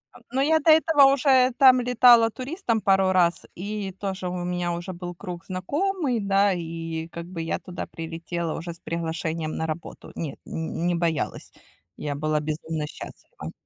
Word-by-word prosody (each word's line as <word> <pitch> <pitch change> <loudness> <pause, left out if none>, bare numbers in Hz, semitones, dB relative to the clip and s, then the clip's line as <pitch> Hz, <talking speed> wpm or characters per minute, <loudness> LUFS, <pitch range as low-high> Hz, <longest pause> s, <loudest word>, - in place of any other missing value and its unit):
Ан - - -15
но 265 +1 +1
я 315 +3 +4
до 315 - +2
этого 315 -3 +6
уже 260 -2 +4
там 260 -3 +7
летала 240 -2 +6
туристом 255 - -2
пару 195 -2 +3
раз, 175 -2 +2
и 200 +1 -4
тоже 190 -2 -3
у 180 0 -4
меня 175 -1 -1
уже 175 +2 -5
был 175 0 -7
круг 180 -1 -7
знакомый. 280 - -1
Да, 200 -1 +3
и 165 -1 -5
как 170 0 -8
бы 170 -1 -6
я 165 - -2
туда 180 -2 -7
прилетела 165 0 -4
уже 170 +1 -6
с 170 - -19
приглашением 165 -1 -3
на 160 - -2
работу. 160 +1 -7
Нет, 155 -4 -5
нь 160 +1 -4
не 175 0 +2
боялась. 165 -2 -2 0.5
Я 145 - -3
была 155 +1 0
безумно 155 +1 -3
счастлива. - - -10
180 Hz, 170 wpm, -25 LUFS, 165-230 Hz, 0.5 s, там